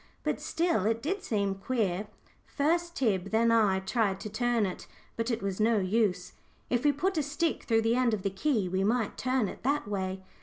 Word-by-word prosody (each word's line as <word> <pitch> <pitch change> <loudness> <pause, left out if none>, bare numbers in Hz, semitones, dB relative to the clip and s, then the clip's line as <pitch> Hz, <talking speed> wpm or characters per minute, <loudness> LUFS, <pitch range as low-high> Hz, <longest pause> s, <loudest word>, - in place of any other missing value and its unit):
But - - -1
still, 325 - 0
it 225 0 +1
did 380 +7 -1
seem 200 -3 0
queer. 200 -2 -1 0.4
First 340 +4 0
Tib, 200 -7 0
then 230 +2 +3
I, 205 -4 +3
tried 195 -1 0
to 215 - -5
turn 240 0 +1
it, 185 - -6 0.3
but 230 +1 -2
it 230 -3 -2
was 195 0 -2
no 220 +1 +3
use. 190 -2 0 0.4
"If 245 0 +1
we 295 - +5
put 330 +5 0
a - - +3
stick 300 +3 -1
through 225 -1 +2
the 225 +1 +2
end 245 -3 +2
of 195 - -8
the 195 - 0
key, 210 -1 0
we 190 +1 0
might 225 +1 0
turn 255 -3 0
it - - -8
that 280 -2 0
way." 190 -2 -3
225 Hz, 205 wpm, -29 LUFS, 195-255 Hz, 0.4 s, we